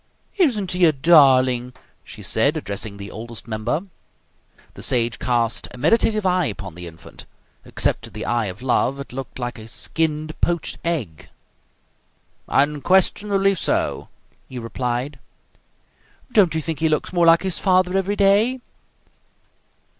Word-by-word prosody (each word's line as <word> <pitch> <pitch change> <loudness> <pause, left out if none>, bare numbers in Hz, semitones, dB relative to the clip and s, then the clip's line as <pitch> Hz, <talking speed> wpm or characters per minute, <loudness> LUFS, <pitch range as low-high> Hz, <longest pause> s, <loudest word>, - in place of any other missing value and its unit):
"Isn't 225 - +2
he 180 0 +3
a 160 - +5
darling!" 130 -5 +4 0.3
she - - -11
said, - - +2
addressing 100 0 -5
the 100 0 -8
Oldest 115 +1 -8
Member. 115 +7 -2 0.9
The - - -11
Sage 120 -1 0
cast 120 0 0
a - - -12
meditative 215 - +2
eye 180 -3 +2
upon 100 -4 -6
the 90 +1 -8
infant. 80 0 -13 0.4
Except - - 0
to - - -11
the - - -7
eye 115 -1 0
of 95 +6 -8
love, 130 +1 +1
it 140 - -8
looked 135 +1 -7
like 120 -2 -5
a 110 - -10
skinned 155 +5 -2
poached 175 -2 -1
egg. 130 - -3 1.2
"Unquestionably 190 +7 +2
so," 185 - -2 0.4
he 130 - -8
replied. 125 +3 -3 1.1
"Don't 195 -9 +4
you 160 - 0
think 160 0 -4
he 160 0 +2
looks 155 +3 -1
more 175 -1 +3
like 165 +1 +6
his 190 -3 -1
father 185 -1 +2
every 195 +1 0
day?" 205 +6 +3
145 Hz, 140 wpm, -21 LUFS, 120-180 Hz, 1.2 s, like